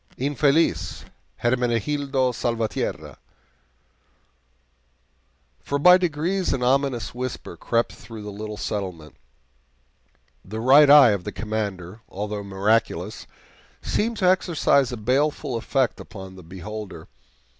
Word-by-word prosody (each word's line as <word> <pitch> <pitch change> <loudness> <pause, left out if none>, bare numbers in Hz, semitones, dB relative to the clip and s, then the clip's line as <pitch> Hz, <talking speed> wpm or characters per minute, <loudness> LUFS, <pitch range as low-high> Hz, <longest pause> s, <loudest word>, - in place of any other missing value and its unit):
Infeliz 145 +3 +1 0.4
Hermenegildo 130 +2 0
Salvatierra! 115 -1 -3 2.4
For 140 - -2
by 180 +5 +7
degrees 180 +2 -1
an 125 - -2
ominous 130 -3 0
whisper 125 +1 -6
crept 115 0 -2
though 115 -1 -8
the 105 0 -7
little 105 +1 -7
settlement. 90 -9 -5 1.3
The 110 +3 -6
Right 140 +5 +6
Eye 145 -5 +9
of 100 -3 -2
the - - -5
Commander, 105 -2 -4
although 105 +1 -5
miraculous, 100 -1 -1 0.6
seemed 230 +2 -1
to 185 - +1
exercise 165 -7 +2
a 125 - -4
baleful 135 +4 0
effect 130 +2 0
upon 95 -3 -10
the 95 - -11
beholder. 95 0 -8
120 Hz, 105 wpm, -23 LUFS, 105-140 Hz, 2.4 s, Eye